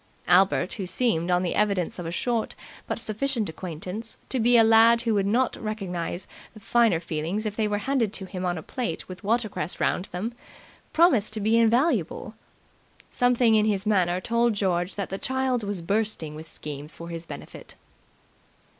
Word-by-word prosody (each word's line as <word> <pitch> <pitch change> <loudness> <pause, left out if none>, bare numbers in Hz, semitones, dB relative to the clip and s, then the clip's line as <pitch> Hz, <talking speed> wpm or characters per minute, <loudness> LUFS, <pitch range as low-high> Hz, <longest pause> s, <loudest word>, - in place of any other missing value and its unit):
Albert, 190 0 +4
who 195 -4 -4
seemed, 180 -6 +1
on 180 0 +2
the 175 - -1
evidence 200 -4 0
of 175 - -4
a - - -3
short 230 +4 -1 0.3
but - - -2
sufficient 230 0 -1
acquaintance, 185 +6 -5
to 260 - -1
be 240 +1 +5
a 225 - +7
lad 225 +1 +6
who 230 -2 +1
would 200 -2 +1
not 240 +4 +2
recognize 185 -5 -4 0.3
the - - -11
finer 225 -5 +3
feelings 170 +6 -3
if 210 -1 -3
they 215 -1 +1
were 205 0 0
handed 240 -1 0
to 200 -2 -5
him 185 -1 -6
on 175 -1 -1
a 160 - -6
plate 235 -11 -4
with 185 +2 -10
watercress 215 -6 -1
round 180 - 0
them, 205 +7 -4 0.6
promised 260 - +4
to 220 - -2
be 215 +2 +2
invaluable. 235 +7 +2 0.8
Something 245 -2 +3
in 215 -1 +4
his 200 -1 0
manner 185 -4 +2
told 235 +3 +1
George 180 -2 0
that 200 -2 -4
the 195 - -3
child 260 -1 0
was 200 -4 -4
bursting 200 -5 -1
with 160 +1 -10
schemes 150 +1 -7
for 170 0 -9
his 165 0 -6
benefit. - - -10
210 Hz, 180 wpm, -26 LUFS, 180-230 Hz, 0.8 s, a